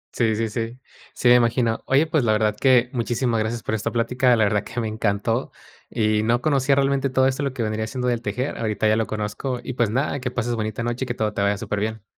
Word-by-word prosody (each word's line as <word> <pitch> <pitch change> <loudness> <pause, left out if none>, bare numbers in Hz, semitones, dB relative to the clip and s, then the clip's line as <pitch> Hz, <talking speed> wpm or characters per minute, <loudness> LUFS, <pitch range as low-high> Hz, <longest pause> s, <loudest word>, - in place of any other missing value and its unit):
Sí, 110 -3 +2
sí, 115 +1 -1
sí. 115 +2 -4 0.4
Sí, - - 0
me 125 - +8
imagino. 115 -1 +1
Oye, 135 +4 +4
pues, 155 -4 +1
la 110 -2 +3
verdad 105 0 +1
que 125 -2 +3
muchísimas 120 -1 0
gracias 110 +1 -2
por - - -3
esta 110 - -1
plática. 125 +1 +2
La 110 - +2
verdad 105 0 +1
que 120 - -5
me 115 - -1
encantó 110 +3 -1 0.4
y 110 -2 +1
no 115 +2 +2
conocía 140 0 +2
realmente 140 0 +1
todo 130 0 +2
esto, 130 +1 0
lo 140 -1 -1
que 125 -3 -3
vendría 110 0 -2
siendo 125 +1 -3
del 120 -1 0
tejer. 125 +7 -3
Ahorita 110 -1 0
ya 110 - +4
lo 110 -1 0
conozco 110 +4 -3
y 130 - -5
pues 120 -3 +1
nada, 135 +5 -1
que 125 - -3
pases 120 -1 -2
bonita 110 0 -3
noche 120 +2 -2
y - - -11
que 120 - -3
todo 105 -2 -1
te - - -2
vaya 100 0 +1
superbién. 105 +2 -3
115 Hz, 245 wpm, -23 LUFS, 110-125 Hz, 0.4 s, me